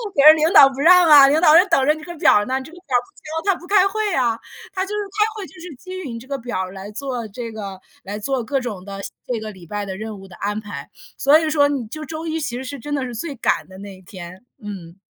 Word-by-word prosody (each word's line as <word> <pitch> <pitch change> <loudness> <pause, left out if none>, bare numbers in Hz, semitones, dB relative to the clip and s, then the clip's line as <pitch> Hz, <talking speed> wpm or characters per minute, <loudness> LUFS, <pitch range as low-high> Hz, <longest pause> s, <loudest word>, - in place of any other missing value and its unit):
但 285 +2 +6
是 310 - +10
领 315 +1 +1
导 280 -7 +10
不 270 0 -9
让 350 +2 +6
啊， 285 -2 +9
领 295 +3 +3
导 315 -2 +7
就 360 - +6
等 270 - +3
着 300 - +4
你 310 0 -10
这 345 - -8
个 345 - -9
表 205 -8 +4
呢， 260 +2 -1
这 315 - -12
个 355 - -14
表 355 - -32 0.2
不 320 +1 -8
交， 400 - +4
他 - - -8
不 350 - -13
开 395 0 +4
会 425 0 -2
呀， 240 -6 +1 0.4
他 375 -1 -1
就 - - -11
是 420 - -3 0.2
开 420 - +5
会， 415 -3 -6
就 - - -18
是 350 -2 -9
基 370 +6 -12
于 305 -8 -6
你 230 - -6
这 255 - -14
个 280 -1 -3
表 235 -5 -5
儿 185 0 -5
来 195 +1 -9
做 245 -1 -5
这 230 +2 -7
个 200 -3 -7 0.2
来 205 +2 -6
做 260 +2 -2
各 270 +4 -1
种 210 -7 -6
的 195 -1 -7 0.3
这 245 -3 -2
个 215 0 -6
礼 185 -4 -14
拜 205 +4 -4
的 190 -1 -6
任 215 -1 -7
务 195 - -12
的 185 - -13
安 205 +1 -3
排， 205 -1 -8 0.3
所 290 +3 +5
以 315 -1 -1
说 290 -2 +3
你 275 -5 -2
就 310 +7 -7
周 320 +2 -6
一 320 0 -2
其 245 -6 -4
实 260 - -6
是 280 +1 -7
真 290 +5 -6
的 275 - -2
是 245 -2 -7
最 285 +5 -5
赶 235 - 0
的 190 0 -13
那 200 0 -9
一 - - -18
天， 185 +2 -11 0.2
嗯。 185 -5 -8
265 Hz, 320 characters per minute, -20 LUFS, 210-315 Hz, 0.4 s, 是